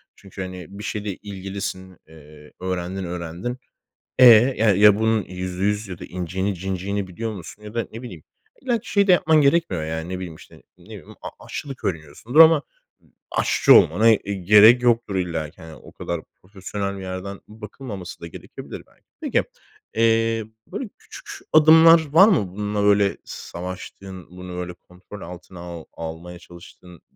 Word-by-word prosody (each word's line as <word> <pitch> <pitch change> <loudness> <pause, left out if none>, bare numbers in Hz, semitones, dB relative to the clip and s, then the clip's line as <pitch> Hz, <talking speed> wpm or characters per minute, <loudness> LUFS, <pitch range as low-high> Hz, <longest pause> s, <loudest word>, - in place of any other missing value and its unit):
Çünkü, 95 0 -11
hani, 90 -2 -7
bir - - -7
şeyde 105 -2 -4
ilgilisin, 95 -2 -7
eee, 75 -1 -16
öğrendin, 95 +1 -4
öğrendin. 90 +7 -5 0.6
E, 130 - +8
ya 115 -2 +6
ya, 105 +1 +6
bunun 110 -1 +2
%100 95 +4 -3
ya 90 -3 -7
da - - -9
inciğini 95 +3 -3
cinciğini 95 +2 -3
biliyor 110 +5 -5
musun 100 +2 -10
ya 105 +1 -10
da 115 -1 -2
ne 115 - -8
bileyim, 90 -11 -9 0.4
illaki 240 -4 -2
şeyi 200 -1 +3
de 185 - +5
yapman 160 -3 +4
gerekmiyor, 140 - +2
yani, 80 +1 -4
ne 90 0 -4
bileyim, 90 -3 -7
işte, - - -17 0.2
ne - - -20
bileyim, - - -12
a - - -5 0.2
aşçılık 135 -2 -7
öğreniyorsundur 85 - -1
ama, 160 -2 +8 0.4
ııı, - - -28 0.2
aşçı - - +4
olmana, 110 +2 +5
eee, 100 -2 0
gerek 105 +6 +6
yoktur 120 -4 +1
illaki, 85 -2 -4
hani, 80 -1 -10
o - - -15
kadar 85 -2 -4 0.2
profesyonel 100 +1 -5
bir 95 - -8
yerden 95 +1 -6
bakılmaması 105 -3 -9
da 85 - -7
gerekebilir 85 - -10
belki. - - -30 0.2
Peki, - - 0 0.5
eee, 115 0 +2 0.2
böyle, 210 +5 -6
küçük - - -13 0.2
adımlar 160 +1 +7
var 190 +6 +8
mı, 145 - +2
bununla, 105 0 -2
böyle, 100 -1 +3
savaştığın, 95 0 -9
bunu, 90 0 -9
böyle, 90 0 -5
kontrol 90 +3 -14
altına 90 +1 -10
al 85 -2 -8
almaya 85 +2 -8
çalıştığın, 85 0 -15
95 Hz, 160 wpm, -22 LUFS, 90-115 Hz, 0.6 s, E